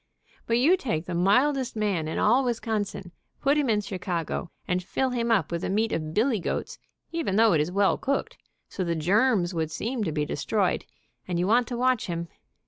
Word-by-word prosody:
But 230 - +2
you 315 +10 +4
take 175 - -2
the 180 - -5
mildest 250 +10 +2
man 200 -7 0
in 160 - -3
all 240 +6 +4
Wisconsin, 220 -6 -2 0.3
put 280 +1 +2
him 290 -4 +1
in 210 -2 +2
Chicago 180 -3 -3 0.2
and 180 0 0
fill 260 +8 -1
him 235 -1 -1
up 195 -9 +2
with 170 0 -2
the - - -2
meat 220 +4 +1
of 155 -1 -2
billy 230 0 +2
goats, - - -4 0.3
even 330 - -1
though 220 -1 +5
it 155 - +3
is 155 +4 -2
well 200 +1 +2
cooked, 275 +1 -2 0.3
so 190 - -4
the 170 -1 -1
germs 190 +3 +2
would 160 -2 -1
seem 230 +8 -3
to 165 - -1
be 150 -1 -1
destroyed, 190 +6 -1 0.4
and 180 -2 -1
you 175 - +1
want 235 +4 +3
to 240 - -4
watch 255 -1 +1
him. 170 -1 -4
205 Hz, 205 wpm, -26 LUFS, 175-240 Hz, 0.4 s, though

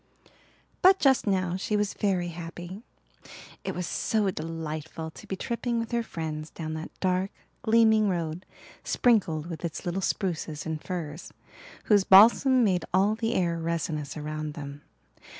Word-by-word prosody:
But 375 +1 +7
just 270 - +3
now 185 -3 +1
she 210 +2 -1
was 205 -1 0
very 185 -4 0
happy. 175 +3 -8 0.8
It - - -3
was 180 - -2
so 210 +1 0
delightful 160 -1 -5
to - - -13
be 190 - -3
tripping 235 +4 -2
with 230 0 -3
her 235 0 +1
friends 155 -6 -5
down 155 -1 -6
that 160 0 -5
dark, 185 +1 +1 0.3
gleaming 220 -2 +4
road 170 -1 -2 0.4
sprinkled 180 -11 +2
with 170 -1 -7
its 170 -2 -4
little 180 +2 -1
spruces 165 -6 -2
and 160 -1 -4
firs, 165 -3 -5 0.5
whose 205 -3 +4
balsam 235 +7 +7
made 185 -5 +2
all 195 +3 +3
the 225 +2 -1
air 170 -2 +1
resinous 160 -3 -3
around 155 0 -4
them. 145 -2 -7
180 Hz, 150 wpm, -27 LUFS, 160-210 Hz, 0.8 s, But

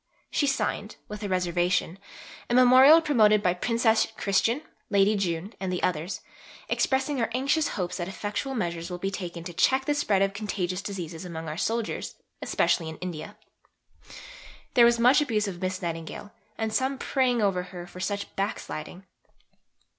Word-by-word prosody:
She 285 - +1
signed, 215 -5 -1
with 210 -1 -7
a 205 - -3
reservation, 180 0 0 0.5
a 240 - +2
memorial 260 +5 +8
promoted 215 -9 +4
by 180 -2 +3
Princess 225 +3 +2
Christian, 225 +8 +1 0.3
Lady 200 0 +4
Jeune, 185 +1 -2
and 185 -2 -2
others, 175 +2 -1 0.5
"expressing 265 0 +1
our 225 - 0
anxious 285 +4 +1
hope 180 -2 -2
that 175 -2 -3
effectual 205 +7 -4
measures 170 -5 -3
will 180 - -4
be 195 +2 -3
taken 175 -4 -6
to 175 0 -7
check 265 +9 +2
the 295 - +2
spread 210 -9 +2
of 195 0 0
contagious 195 -3 -3
diseases 180 -5 -6
among 165 -2 -6
our 155 - -4
soldiers, 225 +5 -2 0.3
especially 165 -2 +1
in 160 - -8
India." 170 -4 -7 1.4
There 240 -3 +7
was 235 0 +4
much 250 +5 +5
abuse 220 -7 0
of 180 -2 -6
Miss 185 0 -3
Nightingale, 165 +4 -5 0.3
and 220 -1 -2
some 265 +4 0
praying 250 -4 +1
over 190 -3 +1
her 180 -1 -8
for 180 - -12
such 200 +2 -3
"backsliding." 195 -3 -4
200 Hz, 160 wpm, -27 LUFS, 180-235 Hz, 1.4 s, memorial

